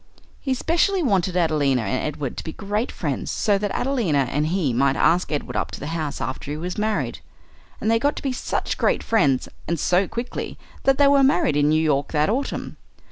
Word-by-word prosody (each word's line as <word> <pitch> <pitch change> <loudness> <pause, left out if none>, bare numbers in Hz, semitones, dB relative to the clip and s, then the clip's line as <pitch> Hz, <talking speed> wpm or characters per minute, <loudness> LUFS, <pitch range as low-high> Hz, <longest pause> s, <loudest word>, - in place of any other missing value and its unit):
He 265 -2 -1
specially 345 +7 +1
wanted 190 - +1
Adelina 145 -7 +2
and 110 +5 -1
Edward 145 -4 -4
to - - -4
be 160 - -6
great 210 +4 -2
friends, - - -3
so 205 -2 +1
that 205 0 -1
Adelina 190 - +1
and 150 +2 0
he 165 -7 0
might 135 +3 +2
ask 175 +4 +2
Edward 150 - -3
up - - -1
to - - -8
the - - -6
house 155 -3 -3
after 130 +1 -4
he 150 - -3
was 180 +3 -4
married. 215 0 -1 0.6
And 220 - 0
they 230 - +3
got 285 +5 +1
to - - -7
be 270 -2 -1
such - - -2
great - - +1
friends, 140 - +2 0.2
and 170 -1 -1
so 180 +5 +2
quickly, 235 +1 -5 0.3
that 270 -1 +4
they 285 - +5
were 280 0 +5
married 180 - +3
in 145 0 +3
New 155 +1 +3
York 150 -2 0
that 150 +5 +2
autumn. 275 +4 -3
175 Hz, 210 wpm, -23 LUFS, 145-230 Hz, 0.6 s, they